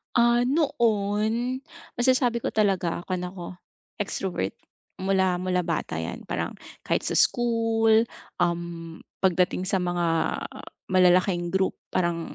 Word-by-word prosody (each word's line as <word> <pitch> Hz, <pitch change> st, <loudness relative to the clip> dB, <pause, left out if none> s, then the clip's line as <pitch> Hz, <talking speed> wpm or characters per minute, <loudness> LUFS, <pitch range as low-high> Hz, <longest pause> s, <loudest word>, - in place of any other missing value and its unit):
Ah, 240 Hz, 0 st, +5 dB
noon 235 Hz, -3 st, +1 dB, 0.3 s
masasabi 245 Hz, -1 st, +2 dB
ko -, -, -1 dB
talaga 195 Hz, -6 st, +1 dB
kuwan 180 Hz, -1 st, -2 dB
ako 180 Hz, -2 st, -8 dB, 0.6 s
extrovert 180 Hz, -, -2 dB, 0.5 s
mula 190 Hz, -1 st, +2 dB
mula 180 Hz, 0 st, 0 dB
bata 125 Hz, -, -2 dB
yan 85 Hz, -, -6 dB
parang -, -, -2 dB, 0.3 s
kahit -, -, -1 dB
sa -, -, -1 dB
school, 225 Hz, -2 st, +3 dB, 0.4 s
um, 170 Hz, -1 st, -3 dB, 0.2 s
pagdating 180 Hz, 0 st, +2 dB
sa 190 Hz, +1 st, 0 dB
mga 175 Hz, -1 st, 0 dB, 0.8 s
malalaking 180 Hz, -1 st, +3 dB
group 190 Hz, 0 st, +1 dB, 0.2 s
parang 170 Hz, -2 st, -1 dB
190 Hz, 110 wpm, -26 LUFS, 175-225 Hz, 0.8 s, Ah